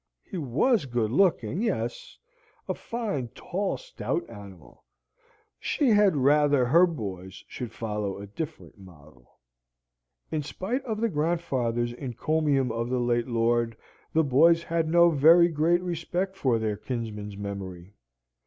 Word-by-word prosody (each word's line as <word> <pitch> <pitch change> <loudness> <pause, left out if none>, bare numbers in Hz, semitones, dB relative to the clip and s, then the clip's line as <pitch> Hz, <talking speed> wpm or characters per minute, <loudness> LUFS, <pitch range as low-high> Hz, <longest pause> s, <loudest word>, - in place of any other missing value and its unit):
He 190 - -6
was 150 - +1
good 120 -3 -1
looking 160 - +2
yes - - -3 0.5
a - - 0
fine 210 - -4
tall 195 +2 -2
stout - - -4
animal; 95 - -13 0.8
she 285 -4 +1
had 205 -5 +4
rather 145 -1 +3
her 170 +9 +5
boys 95 - -7
should 120 -3 -6
follow 105 -3 -4
a 100 - -8
different 145 +1 -7
model. 75 -9 -17 1.0
In 155 - -1
spite 195 - -4
of 220 -3 -3
the 230 - +2
grandfather's 140 - -1
encomium 135 +1 0
of 115 +1 -3
the 130 - 0
late 120 0 0
lord, 115 -1 +1 0.3
the 160 - +3
boys 165 +5 +4
had 165 -1 -1
no 170 +1 +5
very 165 +4 +6
great 170 +3 +2
respect 180 +2 -3
for 130 -10 +1
their 110 -2 -2
kinsman's 105 -5 -5
memory. 100 -2 -7
135 Hz, 135 wpm, -27 LUFS, 115-170 Hz, 1.0 s, very